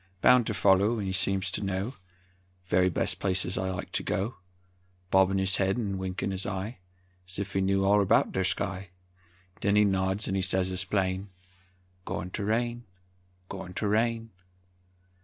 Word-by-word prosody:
Bound 125 +4 +5
ter 110 - 0
foller 100 +3 +3
'n 95 -2 -2
seems 95 -1 0
to - - -1
know 95 +5 -2 0.7
Very 90 0 +3
bes' 85 - 0
places 95 -1 0
I 95 0 -1
like 95 - -5
to - - 0
go; 105 +6 -2 0.7
Bobbin' 95 0 +4
his 95 0 +1
head 95 +2 +1
'n 100 -5 -2
winkin' 95 +1 -3
his 95 0 -2
eye, 100 +2 -4 0.5
'S 90 - -6
if 100 0 -4
he 95 - +1
knew 95 0 +2
all 105 +1 +5
erbout 100 - +3
ther 95 - 0
sky; 95 0 -2 0.7
'Nen 100 +1 +3
he 105 0 +5
nods 95 +1 0
an' 95 0 0
sez 95 0 +1
as 95 0 0
plain, 95 0 -1 0.8
"Goin' 95 -1 -4
ter 100 - -3
rain; 120 +2 -1 0.6
goin' 95 -2 -8
ter 105 - -1
rain!" 115 +1 0
95 Hz, 165 wpm, -28 LUFS, 95-105 Hz, 0.8 s, Bound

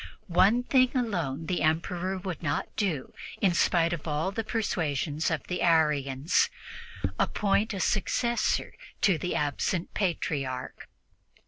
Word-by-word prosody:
One 200 +6 +4
thing 255 0 +3
alone 170 - -1
the 180 +2 -1
Emperor 175 +4 0
would 185 -2 -5
not 145 -3 -2
do 170 -11 -2 0.3
in 190 -3 +3
spite 170 0 +2
of 165 -1 -5
all 155 +5 0
the 225 +3 -3
persuasions 165 - -1
of 160 -3 -2
the 180 - -4
Arians 150 -4 +2 0.7
appoint 210 +1 +1
a - - -4
successor 235 +4 0 0.3
to 185 -6 +3
the 180 - -2
absent 150 +4 -1
Patriarch. 140 -9 -2
175 Hz, 125 wpm, -28 LUFS, 150-200 Hz, 0.7 s, One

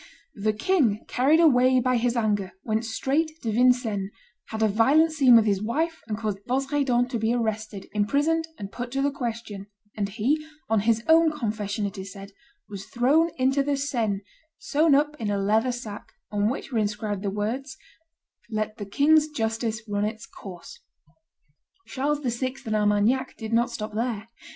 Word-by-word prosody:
The 215 +1 0
king, 225 - +1
carried 280 +6 +3
away 255 -5 +5
by 255 0 +2
his 240 +1 0
anger, 205 -4 0
went 220 +1 -1
straight 310 +8 -1
to 225 - -1
Vincennes, 230 -4 +2 0.4
had 220 0 -2
a - - +5
violent 270 +10 +4
scene 270 -6 +6
with 225 -1 +6
his 200 -2 +1
wife, 320 +10 -1
and 210 - -3
caused 210 -3 -3
Bosredon 265 -1 +1
to 240 -2 -2
be 225 +2 +1
arrested, 220 -3 -3
imprisoned, 290 +10 +1
and 200 -2 -7
put 245 +3 -5
to 275 0 0
the 285 - +2
question; 230 -6 -5 0.3
and 200 -2 -2
he, 250 +9 0 0.2
on 220 -1 +2
his 225 0 +2
own 325 0 +5
confession 215 -6 -3
it 200 0 -5
is 190 0 -7
said, 200 0 -10 0.4
was 200 -1 -8
thrown 285 +8 +3
into 265 +2 +2
the 285 0 0
Seine, 230 -8 -1 0.4
sewn 310 -5 +2
up 295 +1 +1
in 215 - -2
a 205 - 0
leathern 215 +5 +2
sack, 225 -4 -8 0.2
on 205 0 +1
which 270 +2 -5
were 235 - +1
inscribed 210 -1 -2
the 200 - -1
words, 240 +9 -3 0.7
"Let 215 0 -3
the 205 -3 -6
king's 300 +8 +4
justice 225 -5 -2
run 205 0 -1
its 215 +1 -3
course!" 190 - -11 1.1
Charles 290 +2 -1
VI. 255 0 -2
and 215 -1 -1
Armagnac 210 +5 +1
did 220 -1 -5
not 235 +1 +3
stop 215 0 -5
there. 225 -1 -3
230 Hz, 175 wpm, -25 LUFS, 210-275 Hz, 1.1 s, scene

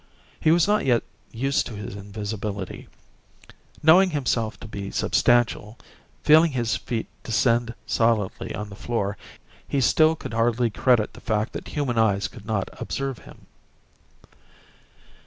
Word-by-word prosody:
He - - +2
was 170 +3 +4
not 210 +1 +2
yet 120 -3 +2 0.3
used 135 +4 0
to 115 - -8
his 100 -1 -7
invisibility; 100 -1 -5 1.0
knowing 180 +5 +7
himself 125 -7 -1
to - - -8
be 100 -2 -6
substantial, 120 -2 +1 0.5
feeling 155 0 +6
his 120 -3 0
feet 115 -2 -3 0.2
descend 115 +1 +1
solidly 115 -4 0
on 105 0 -5
the 100 - -10
floor, 100 -2 -2 0.5
he 140 - 0
still 155 +5 +4
could 130 - -8
hardly 115 +1 +1
credit 120 0 +2
the - - -13
fact 110 0 -1
that - - -6
human 130 -6 -1
eyes 100 -3 +2
could 110 -3 -14
not 110 -4 -1
observe 135 -3 -3
him. - - -16
115 Hz, 140 wpm, -24 LUFS, 105-135 Hz, 1.0 s, knowing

